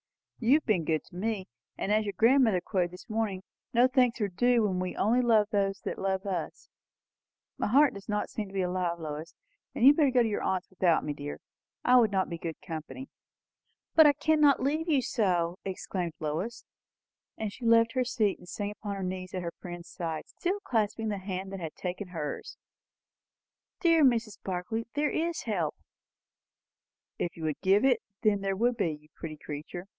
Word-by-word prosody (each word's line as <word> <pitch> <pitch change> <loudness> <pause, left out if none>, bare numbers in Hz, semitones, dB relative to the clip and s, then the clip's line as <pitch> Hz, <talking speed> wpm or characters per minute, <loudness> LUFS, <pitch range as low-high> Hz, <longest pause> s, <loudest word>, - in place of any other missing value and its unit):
"You 245 +4 +5
have 310 - +1
been 185 -8 +1
good 155 0 0
to - - -17
me. 200 0 -2 0.3
And, 200 - -2
as 215 +1 +3
your 200 - -4
grandmother 230 -4 +5
quoted 180 -3 0
this 180 +1 -13
morning, 215 -4 -2 0.3
no 245 +2 +6
thanks 255 -2 +2
are 210 - +1
due 235 +5 +2
when 190 -3 0
we 185 0 -3
only 235 +5 +3
love 225 -4 +4
those 195 -1 +1
who - - -2
love 190 0 -2
us. 190 -3 -4 0.9
My - - 0
heart 275 +6 +5
does 200 +1 -11
not 210 0 -1
seem 215 -2 -4
to 195 - -14
be 190 - +1
alive, 180 -1 -1
Lois. 155 +1 -6 0.4
You 235 - +2
had 280 +2 +9
better 295 -4 +5
go 250 -2 +4
to - - +1
your 210 - -2
aunt's 185 0 -1
without 180 -3 +2
me, 150 - -2
dear. 145 0 -6 0.5
I 250 0 +7
should 225 - +3
not 190 -1 +1
be 170 -1 -5
good 165 -2 -5
company." 165 - -7 0.8
"But 315 -2 +8
I 290 - +6
cannot 295 -2 +3
leave 310 +5 0
you 280 -5 +3
so!" 180 -7 0
exclaimed 185 -2 -3
Lois; 160 +10 -3 0.7
and 215 -2 -3
she 250 - -12
left 230 0 +5
her 255 - +2
seat 220 -5 0
and 180 - -14
sank 205 +2 -4
upon 205 -2 -4
her 195 - -4
knees 185 0 -4
at 180 - -3
her 170 - -4
friend's 175 -1 -8
side, 165 -3 -4
still 375 +3 -2
clasping 220 - 0
the 205 -2 -2
hand 190 0 -5
that 195 - -5
had 160 -3 -6
taken 185 +2 -4
hers. 160 -5 -5 1.2
"Dear 330 -3 +4
Mrs. 230 -5 +2
Barclay, 190 +5 -3
there 295 0 +1
is 335 +1 -1
help." 175 -9 -1 1.4
"If 175 - -3
you 165 - -7
could 155 -2 -2
give 200 +6 +4
it, 255 -2 +4 0.2
there 200 -2 +2
would 240 +4 +2
be, 180 -7 +1
you 150 0 -14
pretty 155 -2 -7
creature!" 150 +5 -7
200 Hz, 195 wpm, -29 LUFS, 180-235 Hz, 1.4 s, had